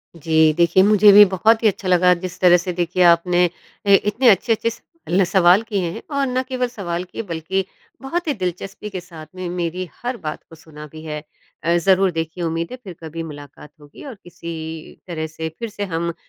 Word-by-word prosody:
जी, 160 -1 +3
देखिए 170 +2 +4
मुझे 210 0 +6
भी 205 +1 +10
बहुत 220 +5 +3
ही - - +6
अच्छा 195 -2 -2
लगा 180 0 +5
जिस 185 -1 -7
तरह 180 -1 +6
से 180 +1 -4
देखिए 175 +1 0
आपने 175 +1 +4 0.4
ए, 200 - +6
इतने 210 +6 +2
अच्छे-अच्छे 225 +3 +2
स 230 - -11 0.3
ल 185 +2 +3
सवाल 180 +2 +4
किए 200 -6 -2
हैं, - - -8
और 280 -1 0
ना 255 0 0
केवल 255 -1 -2
सवाल 180 -7 -4
किए 185 +4 -7
बल्कि 180 +2 -3 0.4
बहुत 335 +6 -3
ही 295 - +1
दिलचस्पी 190 +1 -5
के 190 -3 -5
साथ 165 -3 -12
में 185 -1 -5
मेरी 180 +1 -3 0.2
हर 245 0 -3
बात 150 - -5
को 165 - -13
सुना 150 -1 -12
भी 155 +2 -12
है। 150 -1 -5 0.4
अ, 170 +1 +2
ज़रूर 190 +1 +3
देखिए 165 +2 -4
उम्मीद 165 0 -2
है, 255 - -6
फ़िर 190 -4 -8
कभी 165 +1 -6
मुलाकात 145 -1 -11
होगी 145 0 -14
और 265 -4 -8
किसी 160 -2 -8
तरह 160 -3 -4
से 160 0 -6
फ़िर 230 - -4
से 205 0 -6
हम 170 +1 -2
180 Hz, 205 wpm, -20 LUFS, 165-205 Hz, 0.4 s, भी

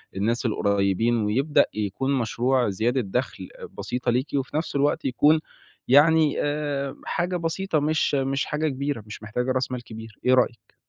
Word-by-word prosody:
الناس 115 +6 -1
القُريبين 100 +2 +1
ويبدأ 125 +8 +2
يكون 110 +6 -2
مشروع 125 0 +1
زيادة 120 +6 0
دخل 120 +5 -3
أ - - -9
بسيطة 125 - -3
ليكِ، 130 +4 0
وفي 135 +2 -2
نفس 155 -2 -3
الوقت 145 +2 +1
يكون 145 +5 +4 0.5
يعني 155 +2 +5
آآ 145 -2 -2
حاجة 180 +1 -1
بسيطة 165 0 -1
مش 155 0 +1
مش 135 0 0
حاجة 150 +1 -1
كبيرة، 140 -4 -3
مش 105 0 -10
محتاجة 125 +4 -2
راس 130 0 -1
مال 125 -1 -4
كبير، 110 -1 -11
إيه 130 - +5
رأيِك؟ 120 -2 0
130 Hz, 160 wpm, -24 LUFS, 115-145 Hz, 0.5 s, يعني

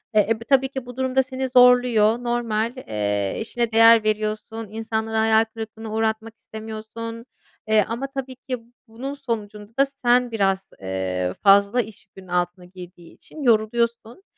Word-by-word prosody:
Eee, 210 - +5
eb 225 0 0
tabii 265 -1 +4
ki 265 -2 -6
bu 245 0 -10
durum 260 0 -2
da 265 - +5
seni 260 0 -4
zorluyor, 245 -2 +5
normal. 235 -1 -1
Eee, 105 - -2
işine 235 +1 -2
değer 225 0 +7
veriyorsun, 215 +1 -2
insanları 220 0 -3
hayal 220 0 +4
kırıklığına 220 -1 -7
uğratmak 220 0 -2
istemiyorsun. 220 +1 -8 0.4
Eee, 215 -2 +4
ama 240 +4 -3
tabii 260 -1 -5
ki 255 -1 -5 0.3
bunun 255 +5 -6
sonucunda 215 -5 -6
da 275 - +6
sen 250 -3 +1
biraz, 195 -3 0
ııı, 95 -1 -2
fazla 200 +4 +5
iş 215 -1 -11
yükünün 190 -1 -15
altına 180 0 -2
girdiği 180 -1 -13
için 310 - -12
yoruluyorsun. 235 - +1
225 Hz, 150 wpm, -23 LUFS, 210-245 Hz, 0.4 s, değer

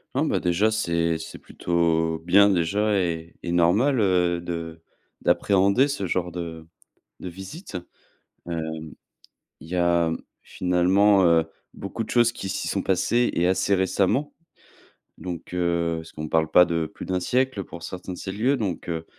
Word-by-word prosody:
Ah, - - +2
bah - - 0
déjà, 90 +6 +2
c'est 85 -6 0
c'est - - -8
plutôt 80 -1 0
bien, 100 +3 +6
déjà 100 +4 +1
et 85 -2 -2
et 85 - -3
normal, 105 +11 +3
heu, 90 -3 +2
de 85 -1 -6 0.4
d'appréhender 100 +7 +3
ce 100 -10 -3
genre 90 0 -1
de 80 -2 -6 0.6
de 90 - -6
visite. 95 - -8 0.7
Heu, 85 -1 -2 1.0
il 80 - -12
y 90 - -2
a, 85 -1 +2 0.3
finalement, 95 +3 +3
heu, 85 -1 +4 0.3
beaucoup 100 +3 -5
de - - -11
choses 120 -1 +3
qui 95 - -6
s'y - - -3
sont 100 - -1
passées 115 +6 +1
et 85 +1 +2
assez 95 +2 +2
récemment. 95 +9 0 0.8
Donc 90 -1 -7
heu, 85 -2 0
parce 80 0 -9
qu'on 75 0 -6
parle 80 -1 +1
pas 90 - +7
de 85 -2 -1
plus - - -9
d'1 90 -1 -1
siècle 125 0 0
pour 85 - -10
certains 90 0 -6
de - - -9
ces 95 - -5
lieux, 120 +8 +1
donc 100 -10 -3
heu, 80 -1 -3
90 Hz, 165 wpm, -24 LUFS, 85-100 Hz, 1.0 s, pas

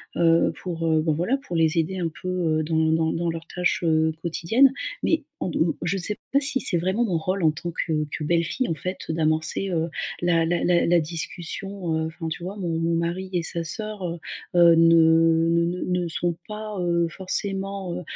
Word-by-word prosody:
heu, 165 -1 +4
pour, 165 -2 -3
heu 160 -1 +3
bah, 160 0 +1
voilà 180 - 0
pour 270 -10 -7
les 160 -1 +2
aider 175 +3 0
un 170 -2 -1
peu, 185 - -4
heu, 165 -4 0
dans 160 0 +1
dans 160 0 +2
dans 170 0 -1
leurs 165 0 -5
tâches, 180 0 -1
heu, 160 -1 +2
quotidiennes 225 +11 +3 0.3
mais 325 -1 +1 0.2
en - - -1
d - - -3
mmh 160 0 +2
je 185 +3 0
sais 205 +3 -2 0.2
pas 280 - +5
si 270 -1 +2
c'est 175 - +2
vraiment 190 +7 0
mon 180 -6 0
rôle 185 +3 -2
en 160 - +5
tant 165 +3 -6
que 165 0 -2 0.2
que 155 - -5
belle-fille 170 - 0
en - - +1
fait 185 +4 -4
d'amorcer, 160 +4 0
heu, 165 -1 0 0.3
la 170 -2 +2
la 175 +1 0
la 175 -1 +3
la 175 0 +4
discussion, 170 +2 -4
heu, 160 - -1
enfin 160 0 -6
tu 160 +2 -6
vois? 190 +3 -5
Mon 180 -4 -3
mon 165 0 +1
mari 170 +3 -2
et 175 -2 0
sa 170 +1 -2
sœur, 215 +5 -4
heu 170 0 -3 0.4
heu, 170 -1 +7
ne 165 0 +5
ne 170 0 +3
ne 175 +1 -2 0.2
ne - - -2
sont 170 +1 -1
pas, 215 -1 -6
heu, 170 -1 +1
forcément, 195 +1 -3
heu - - -5
170 Hz, 215 wpm, -24 LUFS, 165-185 Hz, 0.4 s, heu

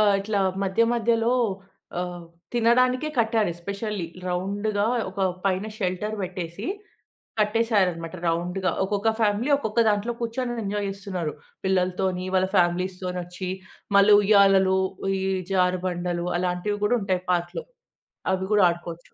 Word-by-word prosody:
ఆహ్, 205 -2 +5
ఇట్లా 205 0 -1 0.2
మధ్య 195 +4 +2
మధ్యలో 235 0 +2 0.7
ఆహ్, 180 -1 -5 0.3
తినడానికే 250 +4 +3
కట్టారు 220 -3 +2
ఎస్పెషల్లీ 200 +1 -4 0.2
రౌండ్‌గా 200 +3 -1 0.3
ఒక 195 +1 -6 0.2
పైన 195 +1 +1
షెల్టర్ 190 +2 -2
పెట్టేసి 180 +3 -5 0.7
కట్టేసారు 210 -2 +3
అన్నమాట. 165 +1 -7
రౌండ్‌గా 180 +3 0
ఒక్కొక్క 205 +3 +1
ఫ్యామిలీ 215 +6 +1
ఒక్కొక్క 220 -3 -2
దాంట్లో 210 +3 0
కూర్చొని 240 0 -2
ఎంజాయ్ 205 0 -2
చేస్తున్నారు. 190 -5 -4 0.3
పిల్లలతోని 185 0 0
వాళ్ళ 185 0 +2
ఫ్యామిలీస్‌తోని 180 +1 0
వచ్చి 180 +1 -6 0.5
మళ్ళీ 200 +1 +7
ఉయ్యాలలు 195 -2 +5 0.4
ఈ - - -2 0.3
జారుబండలు 180 -1 0
అలాంటివి 180 +3 -1
గూడా 240 +4 +3
ఉంటాయి 185 -2 -1
పార్క్‌లో. 175 0 -1 0.7
అవి 190 0 0
గూడా 205 -2 +5
ఆడుకోవచ్చు. 170 0 -7
195 Hz, 120 wpm, -25 LUFS, 180-210 Hz, 0.7 s, మళ్ళీ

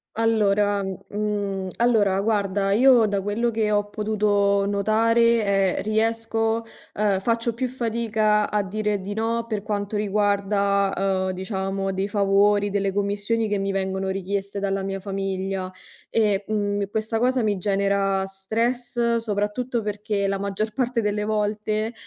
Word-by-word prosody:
Allora 205 -3 +2
mhmm, 200 0 -3
allora, 210 -5 +3
guarda, 200 -2 0
io 240 +1 +6
da 200 -1 0
quello 225 +4 0
che 220 -1 0
ho 205 0 +1
potuto 205 -2 +1
notare, 215 -1 +2
ehm, - - -2
riesco 225 +1 0 0.3
ehm, 205 -2 +1
faccio 230 +2 0
più 255 +2 -2
fatica 225 -3 0
a 210 -1 0
dire 210 +1 -2
di 200 +2 -5
no 230 +1 -1
per 215 -3 -2
quanto 205 0 -3
riguarda, 200 -1 +1
uhm, 190 -1 0
diciamo, 195 0 -3
dei 190 +1 -1
favori, 205 0 +2
delle 200 -1 0
commissioni 205 +3 0
che 205 -1 -1
mi 195 0 -1
vengono 190 0 -2
richieste 195 +1 -3
dalla 195 0 -1
mia 195 0 -3
famiglia 195 -1 -3 0.4
e, 205 -3 +1
mhmm, 205 -1 0
questa 220 +1 -2
cosa 250 0 +2
mi 205 -2 +1
genera 195 0 +1
stress, 235 +4 -1
soprattutto 225 +2 -2
perché 210 -1 -2
la 195 0 -1
maggior 200 +2 -2
parte 245 -2 0
delle 210 0 -1
volte, 215 +1 -1
205 Hz, 140 wpm, -24 LUFS, 195-220 Hz, 0.4 s, io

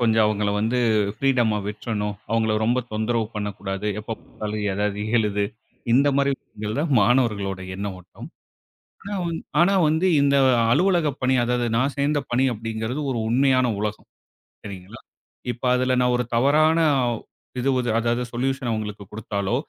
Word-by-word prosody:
கொஞ்சம் 115 -2 +3
அவுங்கள 105 -1 0
வந்து 115 +3 0 0.4
ஃப்ரீடம்மா 120 -6 +2
விட்டுறணும். 105 -1 -3
அவுங்கள 110 -1 +1
ரொம்ப 120 +3 +2
தொந்தரவு 110 +1 0
பண்ணக் 105 -1 -4
கூடாது. 95 +1 -3
எப்ப 110 +1 -5
பாத்தாலும், 105 -1 -5
"ஏதாவது 105 0 -1 0.2
எழுது" 105 -2 0 0.5
இந்த 140 +2 +4
மாரி 140 0 +2
விஷயங்கள் 105 +4 -6
தான் 155 -3 -1
மாணவர்களோட 100 -4 +1 0.2
எண்ண 100 +1 -4
ஓட்டம். 90 0 -12 0.8
ஆனா 205 - -4
வந் 165 -1 -2 0.2
ஆனா 185 +3 +4 0.2
வந்து 160 +4 +1
இந்த 140 0 +3 0.4
அலுவலகப் 170 -5 +2
பணி 130 +1 +2
அதாவது 120 0 0
நான் 130 +4 +2
சேந்த 145 +1 +1
பணி 125 +2 +2
அப்படிங்கறது 115 +4 -4
ஒரு 120 - -2
உண்மையான 130 +1 +3
உலகம். 105 0 -4 0.6
சரிங்களா. 100 +2 -9 0.5
இப்ப 120 +3 -12
அதுல 130 0 +1
நான் 125 0 +2
ஒரு 125 - -1
தவறான 150 +6 +4 0.3
அவ் 120 -2 -1 0.4
இது 135 +2 +1
வது 125 -1 -1
அதாவது 120 +1 0
சொலுயூசன் 130 0 -1
அவுங்களுக்கு 105 -2 -4
கொடுத்தாலோ, 100 0 -3
115 Hz, 150 wpm, -23 LUFS, 105-130 Hz, 0.8 s, இந்த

